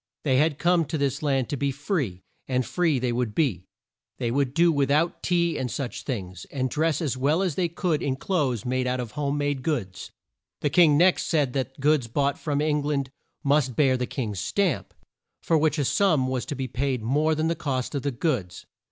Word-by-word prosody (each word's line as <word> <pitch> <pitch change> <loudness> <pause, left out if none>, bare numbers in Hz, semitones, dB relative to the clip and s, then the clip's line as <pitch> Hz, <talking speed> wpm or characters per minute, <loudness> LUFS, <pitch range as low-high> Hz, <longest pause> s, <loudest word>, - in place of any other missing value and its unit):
They 130 -4 +2
had 150 0 +2
come 175 0 +2
to 155 +3 -3
this 140 -1 -1
land 135 -4 +1
to - - -1
be 140 +1 0
free, 135 - -3 0.2
and 130 -1 0
free 155 +4 +1
they 125 -1 0
would 120 -3 -2
be. 115 - 0 0.5
They 115 - -1
would 135 0 0
do 170 0 +5
with 140 -3 +1
out 155 +5 +1
tea 170 -2 +1
and 130 - -2
such 135 -2 -4
things, 95 - -5
and 130 -2 -3
dress 160 +1 0
as 135 -4 -1
well 150 +8 +2
as 180 -5 0
they 175 +3 0
could 170 -2 -1
in 135 -2 0
clothes 135 - -1
made 130 0 0
out 125 0 -1
of 120 -3 -4
home 145 +3 -2
made 145 -2 -1
goods. 120 - -3 0.5
The 145 - 0
king 160 -5 +5
next 180 +3 +3
said 145 -6 +1
that 135 0 -3
goods 145 -3 +2
bought 140 +4 0
from 145 -2 -1
Eng 150 -1 +1
land 140 -2 -1 0.3
must 140 -3 +2
bear 135 -4 +3
the 125 -1 -2
king's 105 -8 -4
stamp, 185 - -1 0.5
for 165 - +2
which 155 0 +2
a 145 - +1
sum 160 -5 +3
was 130 -1 -2
to 145 - -3
be 135 -1 -3
paid 130 -2 -2
more 150 +7 +2
than 155 +1 0
the 165 - +1
cost 135 -5 -3
of 140 - -1
the 145 - -1
goods. 120 - -2
140 Hz, 215 wpm, -25 LUFS, 130-155 Hz, 0.5 s, do